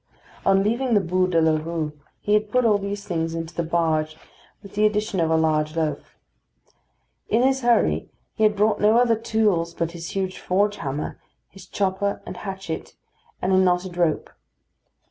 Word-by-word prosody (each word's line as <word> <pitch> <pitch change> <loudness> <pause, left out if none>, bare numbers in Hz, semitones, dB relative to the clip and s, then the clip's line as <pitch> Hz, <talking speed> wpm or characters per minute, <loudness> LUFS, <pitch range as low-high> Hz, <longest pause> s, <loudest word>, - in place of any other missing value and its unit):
On 195 0 +4
leaving 235 +3 +1
the - - +6
Bû 185 0 +1
de 170 -2 +3
la 160 -1 +2
Rue 165 -2 -3 0.3
he 210 - 0
had 210 0 +2
put 250 0 +2
all 210 -3 +4
these 200 0 -5
things 165 -2 -2
hastily 165 - -2
into 165 0 -9
the - - -2
barge, 160 -2 0 0.5
with 200 - -12
the 210 - +1
addition 210 -2 +1
of 165 -1 +2
a 160 - +3
large 155 -1 +1
loaf. 155 -3 -3 1.1
In 230 +3 +3
his 265 0 +2
hurry 240 -1 +2 0.2
he - - -7
had 215 -1 +4
brought 210 +1 +2
no 215 +2 +5
other 240 -1 +4
tools 210 -7 0
but 170 0 -2
his 170 +1 -7
huge 190 -1 -2
forge 205 +3 +1
hammer, 140 -1 -4 0.3
his 190 -1 -14
chopper 200 +1 -1
and - - -7
hatchet, 190 -5 -6 0.5
and 190 - +2
a - - +5
knotted 180 -1 +1
rope. 170 -4 0
190 Hz, 185 wpm, -23 LUFS, 165-210 Hz, 1.1 s, the